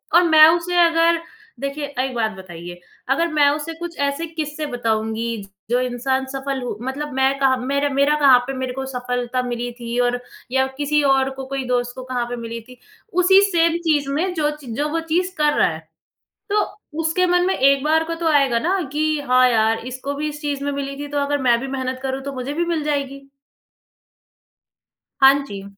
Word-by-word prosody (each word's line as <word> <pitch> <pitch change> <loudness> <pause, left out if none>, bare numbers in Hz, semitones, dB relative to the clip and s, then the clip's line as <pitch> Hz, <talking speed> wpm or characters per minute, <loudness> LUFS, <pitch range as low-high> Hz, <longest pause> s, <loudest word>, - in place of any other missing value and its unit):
और 350 - +7
मैं 315 -2 +8
उसे 355 +1 -4
अगर 335 0 +3 0.4
देखिए 280 +1 -3
एक 260 0 -1
बात 220 -2 0
बताइए 175 -3 -10 0.3
अगर 330 +6 +2
मैं 295 -2 +4
उसे 305 +3 -3
कुछ 340 +1 -7
ऐसे 280 +3 -1
किस्से 310 -1 -4
बताऊँगी 225 -1 -1 0.3
जो 245 +1 +2
इंसान 260 +2 -1
सफ़ल 270 -1 -3
हो 240 -4 -4
मतलब 275 +3 -4
मैं 265 +1 +2
कहाँ 265 -1 +3
मेरा 280 +3 0
मेरा 280 +2 +2
कहाँ 270 -4 +7
पे 270 - -3
मेरे 255 -1 -3
को 265 0 -4
सफ़लता 250 -1 -2
मिली 245 0 -3
थी 235 0 -4
और 245 0 +1 0.3
या 265 0 +3
किसी 295 +1 +1
और 270 -1 +3
को 265 - -5
कोई 270 0 -3
दोस्त 245 -1 0
को 255 - -7
कहाँ 250 -1 -2
पे 245 - -3
मिली 230 0 -6
थी, 250 +3 -16 0.4
उसी 365 +2 +5
सेम 335 -1 +3
चीज़ 290 -3 +2
में 335 +7 -1
ज 300 -1 +2 0.2
जो 295 +4 0
वो 330 +2 -1
चीज़ 340 +3 -1
कर 300 -1 +3
रहा - - +4
है। 160 -1 -5 0.7
तो 420 +1 +3 0.4
उसके 325 +3 +1
मन 355 0 +2
में 380 - +1
एक 275 +1 +3
बार 320 +1 +3
को 330 +1 -3
तो 330 0 -4
आएगा 275 -6 +3
ना 360 +10 0
कि 300 +1 -1 0.3
हाँ 255 0 +5
यार, 225 -1 +2
इसको 260 +3 -5
भी 300 +2 -2
इस 295 0 -7
चीज़ 285 -1 -2
में 285 - -1
मिली 275 0 -4
थी - - -7
तो 290 0 -2
अगर 285 0 0
मैं 240 -2 +4
भी 270 - -4
मेहनत 260 -1 -3
करूँ 265 0 -2
तो 280 +1 -5
मुझे 255 +2 -4
भी 340 +3 0
मिल 335 -2 -1
जाएगी। 275 -2 -2 2.0
हाँ 270 0 +9
जी। 200 -6 -8
275 Hz, 205 wpm, -21 LUFS, 250-300 Hz, 2.0 s, हाँ